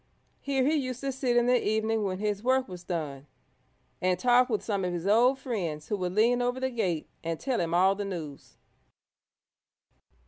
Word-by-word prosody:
Here 270 Hz, -2 st, 0 dB
he 300 Hz, -, +3 dB
used 255 Hz, -5 st, -2 dB
to 275 Hz, -1 st, -1 dB
sit 255 Hz, -2 st, 0 dB
in 240 Hz, -, +4 dB
the 250 Hz, 0 st, +3 dB
evening 220 Hz, +1 st, 0 dB
when 185 Hz, -2 st, -2 dB
his 205 Hz, 0 st, -2 dB
work 260 Hz, +2 st, +2 dB
was 180 Hz, -2 st, -9 dB
done, 150 Hz, -6 st, -4 dB, 0.7 s
and 185 Hz, 0 st, +2 dB
talk 245 Hz, +4 st, +4 dB
with 215 Hz, -3 st, -1 dB
some 200 Hz, -3 st, -1 dB
of 180 Hz, -, -1 dB
his 175 Hz, 0 st, -4 dB
old 240 Hz, +6 st, +4 dB
friends 175 Hz, -, -4 dB
who 210 Hz, -, 0 dB
would 180 Hz, -1 st, -3 dB
lean 240 Hz, +3 st, +3 dB
over 245 Hz, +1 st, -1 dB
the 260 Hz, 0 st, -1 dB
gate 180 Hz, -10 st, -1 dB, 0.2 s
and 165 Hz, -1 st, -3 dB
tell 260 Hz, -3 st, -1 dB
him 170 Hz, 0 st, 0 dB
all 190 Hz, +2 st, +5 dB
the 205 Hz, +1 st, -4 dB
news. 160 Hz, -7 st, -7 dB
215 Hz, 195 wpm, -28 LUFS, 180-250 Hz, 0.7 s, all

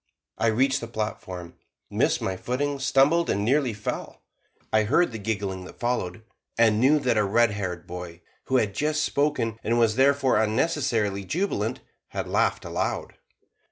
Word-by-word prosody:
I 115 Hz, -, +2 dB
reached 130 Hz, +4 st, +2 dB
the 115 Hz, -, -5 dB
platform, 95 Hz, -6 st, -5 dB, 0.3 s
missed -, -, +1 dB
my 95 Hz, -, -1 dB
footing, 140 Hz, +7 st, -2 dB
stumbled, 140 Hz, +5 st, +3 dB
and 100 Hz, +1 st, 0 dB
nearly 135 Hz, +1 st, +2 dB
fell. 105 Hz, -1 st, -5 dB, 0.5 s
I 110 Hz, -1 st, +4 dB
heard 155 Hz, +7 st, +3 dB
the 110 Hz, -, -6 dB
giggling 100 Hz, -3 st, -3 dB
that -, -, -12 dB
followed, 110 Hz, -5 st, -2 dB, 0.3 s
and 110 Hz, -2 st, +4 dB
knew 135 Hz, +5 st, +5 dB
that 125 Hz, -6 st, +1 dB
a -, -, +3 dB
red 115 Hz, +3 st, +3 dB
haired 95 Hz, -4 st, -4 dB
boy, 90 Hz, -1 st, -8 dB, 0.2 s
who 130 Hz, -, +2 dB
had 105 Hz, -5 st, +1 dB
just 155 Hz, +4 st, 0 dB
spoken, 125 Hz, -6 st, 0 dB
and 115 Hz, +2 st, +1 dB
was 115 Hz, -1 st, +3 dB
therefore 135 Hz, -2 st, +4 dB
unnecessarily 110 Hz, -4 st, 0 dB
jubilant, 180 Hz, -, -2 dB, 0.3 s
had -, -, -4 dB
laughed -, -, +1 dB
aloud. -, -, -2 dB
115 Hz, 160 wpm, -25 LUFS, 105-135 Hz, 0.5 s, knew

